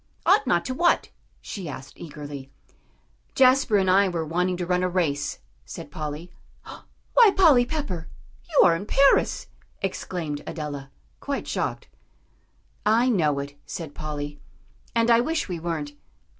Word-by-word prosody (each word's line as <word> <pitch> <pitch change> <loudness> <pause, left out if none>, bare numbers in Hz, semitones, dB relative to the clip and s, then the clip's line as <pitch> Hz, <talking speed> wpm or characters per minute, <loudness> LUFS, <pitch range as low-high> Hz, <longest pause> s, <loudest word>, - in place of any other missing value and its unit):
"Ought 280 - +4
not 170 -4 +2
to 255 - -2
what?" 345 +6 +2 0.3
she 185 -6 -6
asked 135 -1 -8
eagerly. 145 -4 -8 0.9
"Jasper 260 -4 +5
and 190 -1 +1
I 195 +1 +4
were 165 -2 -2
wanting 180 +3 0
to 175 - -3
run 180 +1 +1
a 185 - +1
race," 155 -6 -1 0.3
said - - -9
Polly. 155 +3 -6 0.8
"Why, 470 -3 +7
Polly 290 -10 +6
Pepper! 240 - -4 0.4
You 310 - +5
are 170 - +5
in 195 +5 -6
Paris!" 275 +4 +3 0.3
exclaimed 170 -6 -4
Adela, 145 -3 -5 0.3
quite - - -4
shocked. - - -3 1.0
"I 230 +4 +3
know 155 - +2
it," 140 0 -5
said 160 -4 -6
Polly, 145 -1 -5 0.6
"and 230 0 +3
I 230 - +6
wish 315 +6 -1
we 175 -3 -4
weren't. 160 -3 -4
175 Hz, 145 wpm, -25 LUFS, 150-230 Hz, 1.0 s, Why